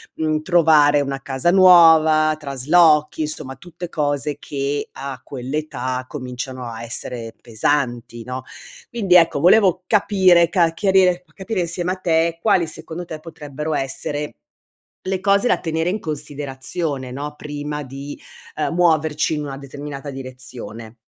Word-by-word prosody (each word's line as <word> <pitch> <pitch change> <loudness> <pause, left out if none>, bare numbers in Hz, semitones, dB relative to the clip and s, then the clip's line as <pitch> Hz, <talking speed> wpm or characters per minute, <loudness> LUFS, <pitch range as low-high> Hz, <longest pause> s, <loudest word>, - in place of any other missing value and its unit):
mhmm, 155 -1 -1
trovare 155 -4 +4
una 135 -1 -3
casa 135 +5 0
nuova, 160 -4 +6
traslochi, 150 +3 +3
insomma 150 -3 -4
tutte 175 +4 -9
cose 145 -1 -1
che 140 0 -3
a 135 -2 -7
quell’età, 130 -1 -4
cominciano 130 -2 -6
a 115 0 -7
essere 115 -1 -6
pesanti, 120 -1 -2
no, 125 +1 -5 0.5
quindi 200 -7 +1
ecco, 165 -4 +5
volevo 185 +1 +4
capire, 190 -5 +4
ca 170 -2 +2
chiarire 185 -1 +2
capire 195 +1 -3 0.2
insieme 180 0 -1
a - - -5
te, 165 -2 +1
quali 190 -5 +3
secondo 160 +2 -8
te 160 -2 -7
potrebbero 150 -1 -6
essere 145 - -3 0.7
le 190 0 -2
cose 200 +4 +3
da - - +2
tenere 160 +1 -1
in 210 - -3
considerazione, 145 -1 -3
no, 145 +2 -6
prima 150 0 -5
di, 140 +2 -8 0.4
ehm, 155 +2 -1
muoverci 160 -3 +2
in 150 - -3
una 135 -2 -6
determinata 140 0 -8
direzione. 125 -4 -8
150 Hz, 135 wpm, -20 LUFS, 135-170 Hz, 0.7 s, nuova